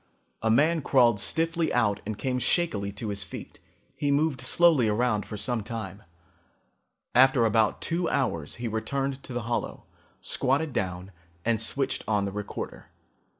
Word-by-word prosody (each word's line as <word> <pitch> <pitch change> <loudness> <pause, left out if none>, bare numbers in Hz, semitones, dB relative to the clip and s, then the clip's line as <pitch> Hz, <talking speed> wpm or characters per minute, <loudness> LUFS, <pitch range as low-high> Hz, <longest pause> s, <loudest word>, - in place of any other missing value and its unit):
A 110 - +1
man 155 +8 +3
crawled 120 -6 +4
stiffly 165 - +1
out 105 -4 +1
and 110 -2 -3
came 125 0 -1
shakily 110 - 0
to 105 +2 -5
his 100 -1 -2
feet. 90 -2 -9 0.4
He 145 - -1
moved 140 -2 +1
slowly 145 -2 +4
around 105 -1 0
for 105 - -6
some 115 +2 0
time. 105 -3 -6 1.1
After 130 -1 +5
about 110 -1 +2
two 170 +1 -1
hours 85 - -1
he 120 0 -4
returned 135 +5 -2
to - - -7
the 120 -2 -3
hollow, 120 +2 -3 0.4
squatted 140 +3 0
down 90 0 -3 0.3
and 115 -1 +1
switched 135 +4 0
on 105 -2 +1
the 100 - -3
recorder. 105 +1 -6
120 Hz, 150 wpm, -27 LUFS, 105-140 Hz, 1.1 s, After